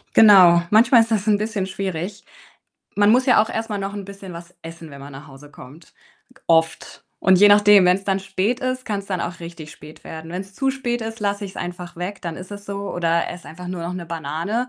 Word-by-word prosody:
Genau, 185 Hz, -6 st, +7 dB
manchmal 230 Hz, +3 st, +5 dB
ist 225 Hz, -, -1 dB
das 215 Hz, -3 st, 0 dB
'n 210 Hz, -1 st, +4 dB
bisschen 215 Hz, -2 st, -2 dB
schwierig. 190 Hz, 0 st, -5 dB, 0.7 s
Man 205 Hz, 0 st, +4 dB
muss 255 Hz, +2 st, +3 dB
ja 250 Hz, -5 st, +5 dB
auch 220 Hz, -, -3 dB
erst 225 Hz, +1 st, -4 dB
mal 205 Hz, -, -2 dB
noch 195 Hz, +1 st, -5 dB
'n 200 Hz, -2 st, -6 dB
bisschen 195 Hz, -1 st, -10 dB
was 170 Hz, +1 st, -11 dB
essen, 165 Hz, -1 st, -10 dB
wenn 140 Hz, 0 st, -11 dB
man 140 Hz, +1 st, -10 dB
nach 135 Hz, +2 st, -11 dB
Hause 140 Hz, +1 st, -14 dB
kommt, 145 Hz, +3 st, -15 dB, 0.4 s
g -, -, -23 dB
oft. 165 Hz, -1 st, 0 dB, 0.2 s
Und 190 Hz, -1 st, +4 dB
je 205 Hz, -, +7 dB
nachdem, 205 Hz, -1 st, +6 dB
wenn's 180 Hz, +2 st, +3 dB
dann 195 Hz, -1 st, 0 dB
spät 195 Hz, +4 st, -2 dB
ist, 255 Hz, -1 st, -3 dB
kann's 200 Hz, -2 st, -4 dB
dann 185 Hz, -3 st, -3 dB
auch 180 Hz, +1 st, -5 dB
richtig 170 Hz, -2 st, -10 dB
spät 150 Hz, +1 st, -14 dB
werden. 160 Hz, 0 st, -9 dB
Wenn's 190 Hz, +2 st, -6 dB
zu 270 Hz, +4 st, 0 dB
spät 245 Hz, -3 st, -3 dB
ist, 225 Hz, 0 st, -6 dB
lasse 205 Hz, 0 st, -2 dB
ich's 190 Hz, -, -9 dB
einfach 175 Hz, 0 st, -7 dB
weg, 185 Hz, +3 st, -6 dB
dann 170 Hz, -2 st, -5 dB
ist 185 Hz, +2 st, -10 dB
es 205 Hz, 0 st, -9 dB
so 200 Hz, 0 st, -5 dB
oder 170 Hz, -1 st, 0 dB
esse 175 Hz, 0 st, -10 dB
einfach 180 Hz, +2 st, -9 dB
nur 180 Hz, -2 st, -5 dB
noch 170 Hz, +1 st, -4 dB
'ne 180 Hz, -2 st, -6 dB
Banane, 165 Hz, -, -3 dB
190 Hz, 235 wpm, -21 LUFS, 170-210 Hz, 0.7 s, Genau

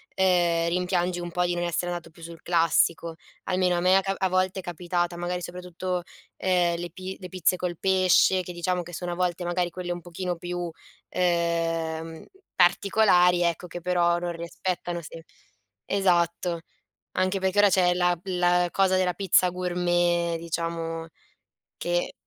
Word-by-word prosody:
ehm, 175 Hz, -3 st, +2 dB
rimpiangi 180 Hz, 0 st, 0 dB
un 175 Hz, 0 st, -6 dB
po' 180 Hz, +1 st, +1 dB
di 175 Hz, -, 0 dB
non 175 Hz, -, -2 dB
essere 175 Hz, +1 st, -1 dB
andato 170 Hz, -1 st, -6 dB
più 165 Hz, +1 st, -18 dB
sul 165 Hz, 0 st, -10 dB
classico. 165 Hz, -1 st, +2 dB, 0.3 s
Almeno 180 Hz, -1 st, +1 dB
a -, -, +1 dB
me 185 Hz, +2 st, +4 dB
è -, -, -1 dB
ca 195 Hz, 0 st, -1 dB
a 190 Hz, -, +1 dB
volte 185 Hz, +1 st, 0 dB
è -, -, -7 dB
capitata, 175 Hz, 0 st, -2 dB
magari, 175 Hz, +1 st, -3 dB
soprattutto, 180 Hz, 0 st, -4 dB, 0.3 s
ehm, 175 Hz, -2 st, +1 dB
le 175 Hz, 0 st, -5 dB
pi 185 Hz, +1 st, -7 dB
le 180 Hz, -, -7 dB
pizze 185 Hz, 0 st, +1 dB
col 180 Hz, -2 st, -3 dB
pesce 185 Hz, 0 st, +4 dB
che, 180 Hz, -, -7 dB
diciamo, 175 Hz, +1 st, -1 dB
che 175 Hz, -, -11 dB
sono 175 Hz, +1 st, -4 dB
a -, -, -5 dB
volte, 180 Hz, -1 st, -1 dB
magari, 175 Hz, 0 st, 0 dB
quelle 175 Hz, 0 st, -4 dB
un 175 Hz, -, -7 dB
pochino 175 Hz, +1 st, -4 dB
più, 175 Hz, 0 st, -4 dB, 0.4 s
ehm, 165 Hz, -2 st, -1 dB, 0.3 s
particolari, 180 Hz, -1 st, +4 dB
ecco, 170 Hz, +1 st, -1 dB
che 175 Hz, -, -7 dB
però 175 Hz, -1 st, +2 dB
non 175 Hz, 0 st, -3 dB
rispettano 170 Hz, +1 st, -4 dB
semp 165 Hz, +1 st, -10 dB, 0.6 s
esatto. 175 Hz, -3 st, +1 dB, 0.5 s
Anche 185 Hz, +1 st, 0 dB
perché 190 Hz, +1 st, -1 dB
ora 205 Hz, -, +6 dB
c'è 180 Hz, -2 st, +3 dB
la 180 Hz, 0 st, +2 dB
p 195 Hz, -, -20 dB
la 180 Hz, -1 st, +2 dB
cosa 190 Hz, -1 st, +3 dB
della 185 Hz, -1 st, +1 dB
pizza 185 Hz, -2 st, +3 dB
gourmet, 175 Hz, -1 st, 0 dB
diciamo, 165 Hz, 0 st, -3 dB, 0.7 s
che 175 Hz, 0 st, -1 dB
175 Hz, 165 wpm, -26 LUFS, 170-180 Hz, 0.7 s, ora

